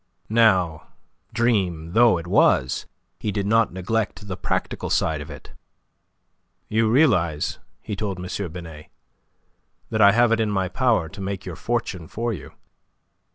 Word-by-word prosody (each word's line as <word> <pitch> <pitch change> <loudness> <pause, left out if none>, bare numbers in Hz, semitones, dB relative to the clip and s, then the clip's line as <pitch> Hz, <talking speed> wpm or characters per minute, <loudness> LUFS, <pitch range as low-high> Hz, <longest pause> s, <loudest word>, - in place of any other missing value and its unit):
Now, 95 -8 +3 0.4
dream 95 -9 0
though 115 -1 +5
it 85 - -6
was, 70 -6 +2 0.3
he 105 - -2
did 100 -1 -2
not 110 +1 +3
neglect 105 +3 -2
the 95 - -4
practical - - -3
side 80 -2 +1
of 75 - -9
it. - - -11 1.2
"You 110 0 +2
realize," 95 - +2 0.2
he 105 - -4
told 100 -2 -3
M. 90 0 -4
Binet, 80 -3 -9 1.0
"that 110 -1 +1
I 100 -1 +8
have 120 0 +4
it 115 - +2
in 110 -1 +1
my 95 -3 0
power 115 -6 +1
to 95 - -10
make 95 0 -4
your 90 -3 -6
fortune 95 -6 -3
for 115 +5 -3
you." 80 - -9
100 Hz, 150 wpm, -23 LUFS, 85-110 Hz, 1.2 s, I